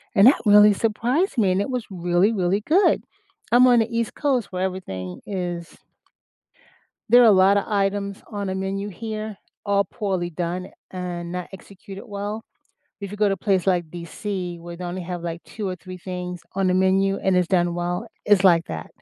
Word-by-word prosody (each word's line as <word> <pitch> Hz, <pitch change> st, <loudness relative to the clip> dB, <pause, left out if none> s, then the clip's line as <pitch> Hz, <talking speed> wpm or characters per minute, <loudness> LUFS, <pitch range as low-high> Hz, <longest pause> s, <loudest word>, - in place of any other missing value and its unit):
and 200 Hz, +4 st, +7 dB
that 275 Hz, -, +7 dB
really 210 Hz, 0 st, +7 dB
surprised 240 Hz, -, 0 dB
me, 200 Hz, -5 st, +3 dB
and 185 Hz, +2 st, +1 dB
it 205 Hz, -, -3 dB
was 250 Hz, -3 st, -3 dB
really, 180 Hz, +3 st, +1 dB
really 190 Hz, 0 st, 0 dB
good. 370 Hz, +6 st, +4 dB, 0.5 s
I'm 245 Hz, +2 st, +7 dB
on 245 Hz, -1 st, +6 dB
the 225 Hz, -, +2 dB
East 230 Hz, -1 st, -2 dB
Coast 265 Hz, -6 st, 0 dB
where 185 Hz, 0 st, -2 dB
everything 95 Hz, -, -5 dB
is 175 Hz, -4 st, -5 dB, 1.3 s
there 245 Hz, +3 st, +7 dB
are -, -, +7 dB
a -, -, +8 dB
lot 195 Hz, +1 st, +5 dB
of 200 Hz, -, +1 dB
items 200 Hz, -1 st, -1 dB
on 200 Hz, -1 st, -3 dB
a 190 Hz, -, -2 dB
menu 195 Hz, +1 st, -3 dB
here, 215 Hz, +1 st, -6 dB, 0.3 s
all 200 Hz, -1 st, +2 dB
poorly 190 Hz, -5 st, -3 dB
done, 175 Hz, +2 st, -3 dB, 0.2 s
and 175 Hz, -2 st, -5 dB
not 180 Hz, -1 st, -5 dB
executed 195 Hz, 0 st, -11 dB
well. 205 Hz, +1 st, -5 dB, 0.6 s
If 200 Hz, -1 st, -6 dB
you 205 Hz, -, -7 dB
go 210 Hz, 0 st, +3 dB
to 195 Hz, -, +2 dB
a 195 Hz, -, -4 dB
place 195 Hz, -2 st, 0 dB
like 175 Hz, -3 st, +1 dB
BC, 175 Hz, 0 st, -5 dB
where 170 Hz, 0 st, -9 dB
they 180 Hz, -, -7 dB
only 180 Hz, +1 st, -4 dB
have, 175 Hz, 0 st, -5 dB
like, 170 Hz, 0 st, -5 dB
2 210 Hz, -3 st, -6 dB
or 185 Hz, -, -3 dB
3 185 Hz, +1 st, -10 dB
things 180 Hz, 0 st, -6 dB
on 195 Hz, 0 st, +1 dB
the 180 Hz, -, +2 dB
menu, 190 Hz, +1 st, +2 dB
and 190 Hz, -1 st, +1 dB
it's 180 Hz, -1 st, +2 dB
done 175 Hz, -2 st, +1 dB
well, 175 Hz, +5 st, -3 dB, 0.2 s
it's 205 Hz, -2 st, +4 dB
like 170 Hz, -3 st, +5 dB
that. -, -, -6 dB
190 Hz, 200 wpm, -23 LUFS, 180-210 Hz, 1.3 s, a